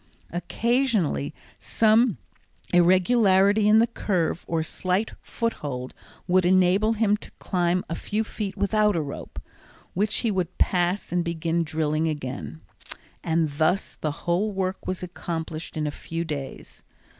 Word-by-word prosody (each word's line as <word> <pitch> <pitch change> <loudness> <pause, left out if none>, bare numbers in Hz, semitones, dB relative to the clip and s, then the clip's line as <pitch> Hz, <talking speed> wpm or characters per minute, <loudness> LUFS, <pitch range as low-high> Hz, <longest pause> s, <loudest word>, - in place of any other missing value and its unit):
Occasionally 190 - 0 0.3
some 225 0 +3 0.6
irregularity 190 +3 +4
in 215 +1 +6
the 225 - +6
curve, 185 -8 -1
or 165 -1 0
slight 185 +6 -1
foothold, 140 - -4 0.3
would 185 0 +4
enable 185 +4 +4
him 210 -2 +2
to - - -8
climb 180 -1 0
a - - -4
few 210 +6 -2
feet 210 -3 -5
without 210 0 +2
a 165 - +1
rope, 140 - -7 0.5
which 210 +3 0
he 230 - +1
would 185 -2 -2
pass 180 +2 +1
and 175 0 +1
begin 170 0 -1
drilling 155 -1 0
again, 110 - -5 0.6
and 165 -1 +1
thus 155 +6 0
the 155 - -2
whole 180 +5 +1
work 190 -1 -3
was 185 -1 -3
accomplished 165 -3 -5
in 155 - -1
a 150 - -1
few 165 +3 -5
days. 145 -4 -7
180 Hz, 135 wpm, -25 LUFS, 160-210 Hz, 0.6 s, in